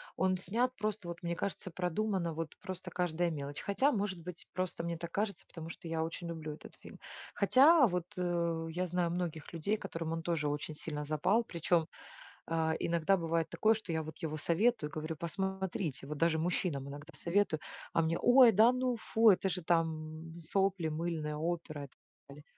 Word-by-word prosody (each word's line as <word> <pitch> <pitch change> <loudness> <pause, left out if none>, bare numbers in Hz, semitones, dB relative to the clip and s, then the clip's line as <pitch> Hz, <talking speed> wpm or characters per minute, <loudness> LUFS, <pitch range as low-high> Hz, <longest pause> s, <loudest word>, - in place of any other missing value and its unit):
Он 185 0 +2
снят 240 +7 0
просто, 210 -4 -2
вот 170 - -6
мне 170 0 -1
кажется, 190 -1 -4
продумано, 180 0 -1
вот 165 -1 -5
просто 185 -2 -5
каждая 175 -1 0
мелочь. 145 -2 -4
Хотя, 260 +9 +2
может 195 -5 -2
быть, 175 0 -8
просто 185 -2 -2
мне 170 -1 -2
так 170 0 -6
кажется, 205 0 -2
потому 165 -2 -9
что 170 - -8
я 160 -1 0
очень 170 +1 -5
люблю 155 -2 -5
этот - - -12
фильм. - - -12 0.4
Хотя, 270 +8 +6
вот, 180 -2 -1
э, 170 -2 0
я 180 +2 -1
знаю 175 -1 0
многих 170 -3 -3
людей, 170 +6 0
которым 165 -5 -4
он 165 - -2
тоже 160 -3 0
очень 145 +1 -2
сильно 150 0 -4
запал. 155 +10 +2
Причем, 170 -4 +1 0.6
а, 160 -1 +1
иногда 170 +3 +2
бывает 165 -2 0
такое, 220 +1 +3
что 205 -5 -6
я 160 - 0
вот 155 0 -8
его 155 -1 -3
советую, 170 +1 +2
говорю: 155 +1 -4
"Посмотрите". 190 -5 -3
Вот 150 0 -4
даже 165 0 +2
мужчинам 160 -5 -1
иногда 145 +4 -9
советую, 170 -3 +1 0.3
а 165 - +4
мне: 165 +1 +1
"Ой, 245 -1 +8
да 225 +5 +7
ну, 255 -1 0
фу, 225 0 +4
это 190 0 +4
же 180 +1 -2
там 160 -1 -1
сопли 190 +1 +1
мыльные, 155 -1 -2
опера 160 -2 -3
и - - -7
так - - -31 0.3
далее". 145 +1 -12
170 Hz, 185 wpm, -33 LUFS, 160-190 Hz, 0.6 s, Ой